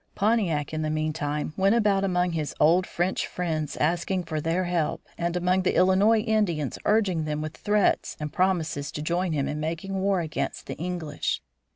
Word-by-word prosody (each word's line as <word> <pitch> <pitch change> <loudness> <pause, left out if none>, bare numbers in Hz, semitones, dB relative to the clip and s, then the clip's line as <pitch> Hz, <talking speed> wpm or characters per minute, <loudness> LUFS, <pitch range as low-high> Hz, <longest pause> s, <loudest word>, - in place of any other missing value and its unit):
Pontiac, 190 -9 +1
in 155 - -1
the 155 - -1
meantime, 155 -1 -2
went 195 +3 +3
about 205 -4 +3
among 180 -2 +1
his 155 -3 -3
old 170 +4 +4
French 175 +2 -1
friends 160 -4 -3
asking 175 +4 0
for 155 -2 -3
their 165 +4 0
help, 175 -3 -1
and 170 +1 -1
among 180 +1 +2
the 185 - 0
Illinois 195 +4 +4
Indians 205 - 0
urging 195 -7 +2
them 150 0 -2
with 155 +1 -5
threats 210 -1 +1
and 150 -1 -5
promises 165 -6 0
to 150 - -5
join 175 +3 0
him 140 -3 0
in 150 - -3
making 165 +5 -3
war 195 -1 +2
against 160 -3 -3
the - - -5
English. 170 -3 -3
175 Hz, 180 wpm, -26 LUFS, 155-190 Hz, -, old